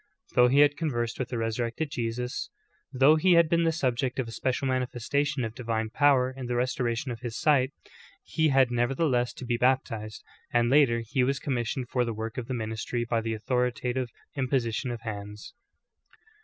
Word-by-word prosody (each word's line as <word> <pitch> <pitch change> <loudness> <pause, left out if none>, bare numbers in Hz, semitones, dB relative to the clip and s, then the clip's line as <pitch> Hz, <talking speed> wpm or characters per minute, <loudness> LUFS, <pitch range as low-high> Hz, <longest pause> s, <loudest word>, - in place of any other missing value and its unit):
Though 125 0 +6
he 135 +3 +5
had 145 0 +4
conversed 120 -8 -2
with 125 -2 -2
the 125 - -3
Resurrected 115 +6 -2
Jesus, 125 0 -3 0.4
though 135 +4 +5
he 180 +3 +4
had 170 -1 +6
been 170 +1 +2
the 165 - +3
subject 130 -4 -1
of 130 -3 -1
a - - -7
special 130 +3 -1
manifestation 130 +2 -1
of 110 -1 -4
divine 115 -3 -3
powder 135 -2 +3
in 130 -2 -6
the 120 - -1
restoration 125 0 -1
of 115 - -6
his 115 -1 -5
sight, 140 -4 +3 0.5
he 160 -1 +1
had 135 -3 +4
nevertheless 125 +1 +1
to 130 - -8
be 120 -1 0
baptized; 120 -4 0 0.3
and 120 0 +2
later 130 -5 +4
he 130 +2 +1
was 135 +2 +1
commissioned 125 -1 -2
for 125 - +1
the 115 -2 -3
work 110 +3 -4
of 120 - -6
the 130 - -2
ministry 110 +1 -3
by 115 -1 0
the 115 0 -2
authoritative 125 +2 -1 0.3
imposition 130 -2 -1
of 120 -2 -5
hands. 105 -1 -7
125 Hz, 185 wpm, -27 LUFS, 115-135 Hz, 0.5 s, Though